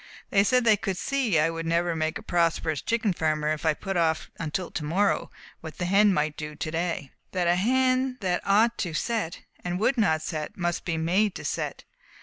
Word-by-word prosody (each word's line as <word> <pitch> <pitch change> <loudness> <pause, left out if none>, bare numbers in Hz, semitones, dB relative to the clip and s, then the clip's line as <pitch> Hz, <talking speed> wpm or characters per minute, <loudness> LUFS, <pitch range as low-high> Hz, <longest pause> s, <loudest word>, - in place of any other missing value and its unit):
They 195 -1 +5
said 250 +4 +3
they 220 -2 +5
could 190 -2 -3
see 250 -6 0
I 155 +2 +3
would 165 0 -4
never 170 +1 +1
make 160 +3 -1
a 220 - -11
prosperous 165 -5 0
chicken 225 -4 0
farmer 155 -2 0
if 155 +1 -1
I 155 - +3
put 195 +3 -3
off 160 -2 0
until 165 +2 -3
to 150 - -4
morrow 190 +7 +1 0.3
what 160 -2 -9
the 180 - -2
hen 195 +1 +4
ought 150 - +4
to 155 - -3
do 150 0 -7
to 155 - -4
day, 170 +1 -1
and 135 - -17 0.2
that 180 -2 +1
a 175 - +5
hen 255 +5 +2
that 180 -3 0
ought 220 +4 +3
to 170 -5 -2
set, 215 -1 -2 0.2
and 180 0 -2
would 245 +4 +2
not 160 -7 +2
set, 155 -2 -4
must 175 -1 -2
be 165 -2 -1
made 185 +5 +1
to - - -7
set. - - -3
175 Hz, 220 wpm, -26 LUFS, 160-205 Hz, 0.3 s, They